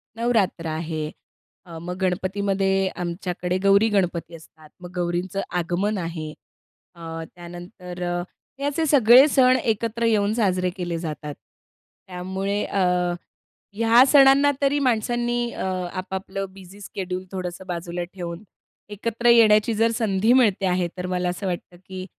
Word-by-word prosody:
नवरात्र 225 -8 0
आहे. 155 -1 -3 0.6
अ, 165 -2 -9
मग 180 +1 -5
गणपतीमध्ये 195 +1 0
आमच्याकडे 180 +1 -3
गौरी-गणपती 195 -4 +2
असतात, 155 -1 -16
मग 175 - -9
गौरींचं 180 +2 -2 0.2
आगमन 185 +5 -1
आहे 165 -3 -5 0.6
अ, 165 -1 -7
त्यानंतर 175 +1 -10
अ, 175 0 -1 0.4
हे 280 - -3
असे 290 +3 0
सगळे 260 0 +7
सण 255 -2 +5
एकत्र 230 +1 -1
येऊन 210 -2 +2
साजरे 185 -5 +1
केले 175 -2 -3
जातात. 150 -3 -6 0.7
त्यामुळे 190 +3 -3
अ, 200 - -2 1.0
ह्या 230 +3 +6
सणांना 280 0 +6
तरी 280 +1 +2
माणसांनी 240 -1 0
अ, - - -5 0.3
आपापलं 190 +1 -4
बिझी 195 +1 -14
शेड्यूल 185 -1 -5
थोडंसं 185 0 -5
बाजूला 175 0 -4
ठेवून 175 0 -6 0.5
एकत्र 230 +3 -1
येण्याची 225 -1 +5
जर 225 +2 +2
संधी 220 -1 +1
मिळते 215 -7 +3
आहे, 180 -1 +1
तर 180 - -4
मला 180 -1 -1
असं 185 +3 -4
वाटतं, 175 0 -5
की 185 -1 -7
190 Hz, 130 wpm, -23 LUFS, 175-225 Hz, 1.0 s, सगळे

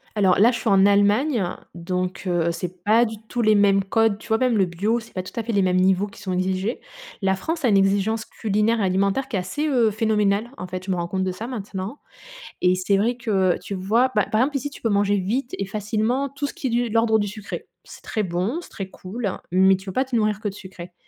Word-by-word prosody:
Alors 190 -4 +3
là, 225 +5 +6
je 235 - -3
suis 225 - -1
en 195 0 +5
Allemagne, 205 +5 +3 0.3
donc 180 +2 -3
heu, 170 -1 +1
c'est 175 +1 -6
pas 220 +3 +5
du 220 -2 -2
tout 240 - -2
les 215 -1 +4
mêmes 195 -1 +4
codes. 220 +1 +1
Tu - - -13
vois, 220 -1 +2
même 250 -2 +2
le 190 - +4
bio, 200 +7 -1
c'est 225 - -14
pas 185 - -3
tout - - -10
à - - +1
fait 230 +1 -4
les 200 -2 +3
mêmes 185 0 +2
niveaux 190 +2 +3
qui 205 0 -13
sont 185 -2 -3
exigés. 190 +5 -1 0.4
La 190 0 +3
France 320 - -3
a - - +5
une 200 - +4
exigence 200 +3 +2
culinaire 215 +1 0
et - - +1
alimentaire 195 +7 +1
qui 210 - -2
est - - +1
assez, 290 +12 -2
heu, 245 -6 +3
phénoménale. 215 +1 +1
En 180 - -5
fait, 185 +1 -6
je 190 - -2
me - - +1
rends 170 0 -2
compte 190 +1 -2
de 185 - -1
ça 220 +6 -6
maintenant 205 0 -6 0.6
et 180 0 +4
c'est 185 +2 +1
vrai 235 +5 +1
que 195 -6 +1
tu 200 - -5
vois, 225 +7 +2
bah, 210 - +4
par 215 - +3
exemple 275 +3 +1
ici, 290 +2 -3
tu - - -12
peux 230 - 0
manger 205 -1 +2
vite 240 +8 -2
et 195 - -2
facilement 220 +6 -1
tout 280 +1 -3
ce - - -8
qui 265 - -3
est - - -3
du 240 +1 +1
de 220 - -6
l'ordre 225 -1 +3
du 205 - -1
sucré. 210 0 -7 0.2
C'est - - -13
très 215 - -2
bon, 190 - -2
c'est - - -14
très 195 -3 -6
cool, 200 +3 -5 0.2
mais 190 +2 +5
tu 190 - -13
peux 190 - -6
pas 260 +5 +1
te 250 -3 -2
nourrir 215 -1 +1
que 210 - -2
de 195 - -6
sucré. 180 -3 -10
205 Hz, 265 wpm, -23 LUFS, 190-230 Hz, 0.6 s, là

